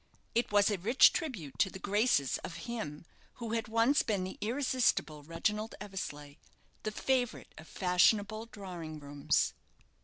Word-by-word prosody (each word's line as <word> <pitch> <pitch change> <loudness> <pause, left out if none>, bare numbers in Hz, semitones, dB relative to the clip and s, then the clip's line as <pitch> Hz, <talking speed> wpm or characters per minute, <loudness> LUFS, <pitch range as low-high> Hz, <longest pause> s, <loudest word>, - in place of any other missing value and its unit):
It 235 -1 +1
was 205 0 +4
a 200 - -1
rich 230 +9 +6
tribute 205 - -4
to 190 - +4
the 190 - -8
graces 200 - +2
of 170 - -7
him 160 -10 -5 0.3
who 230 -2 -6
had 225 -1 -1
once 230 +6 +3
been 200 -4 -1
the 185 - -6
irresistible 240 - +1
Reginald 210 +8 -2
Eversleigh, 150 -8 -6 0.4
the 215 - -3
favourite 250 +2 -1
of 160 - -12
fashionable 205 +4 +2
drawing 175 -7 -7
rooms. 145 -1 0
205 Hz, 145 wpm, -32 LUFS, 165-230 Hz, 0.4 s, rich